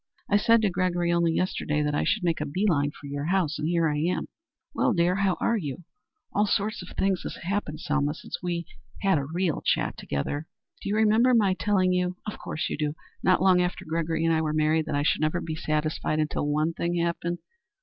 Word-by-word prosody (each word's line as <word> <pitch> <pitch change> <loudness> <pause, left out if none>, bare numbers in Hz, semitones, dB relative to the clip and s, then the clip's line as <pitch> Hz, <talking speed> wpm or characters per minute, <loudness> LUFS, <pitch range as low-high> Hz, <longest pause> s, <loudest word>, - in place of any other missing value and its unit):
I 205 - +4
said 230 +1 +4
to 210 - +4
Gregory 175 -1 0
only 170 -1 +3
yesterday 150 -4 0
that 150 0 0
I 145 - +1
should 215 - +1
make 165 -3 0
a - - 0
bee 185 +9 -1
line 145 -6 +2
for 145 - -13
your 140 +1 -4
house, 170 -3 +1
and 155 - -1
here 170 -1 +2
I 150 -1 0
am. 170 +4 -1 0.4
Well, 245 - +2
dear, 175 0 +2
how 195 -2 +1
are 230 - +2
you? 155 -3 -5 0.5
All 205 +1 +2
sorts 210 +2 0
of 180 - -9
things 195 -2 +1
have - - -7
happened, 175 -4 -2
Selma, 150 0 0
since - - -7
we've 175 -1 -2 0.4
had 195 -6 +3
a 140 - -3
real 170 +2 -1
chat - - 0
together. 145 - -3 0.3
Do - - -4
you 205 - +1
remember 220 +3 +4
my 200 -5 +4
telling 185 -2 +2
you 180 0 0
of 210 - -5
course 155 - -3
you - - -3
do 150 0 -1 0.3
not 185 -1 +3
long 185 -2 +5
after 180 +1 -2
Gregory 165 0 -1
and 165 - +3
I 160 - +2
were 155 -1 -1
married 155 +1 +2
that - - -1
I 145 - +1 0.2
never 155 +2 +1
should - - -6
be 160 - -3
satisfied 155 0 -1
until 150 -1 -1
one 155 +3 +1
thing 170 +1 -1
happened? 170 0 -1
170 Hz, 225 wpm, -27 LUFS, 155-185 Hz, 0.5 s, long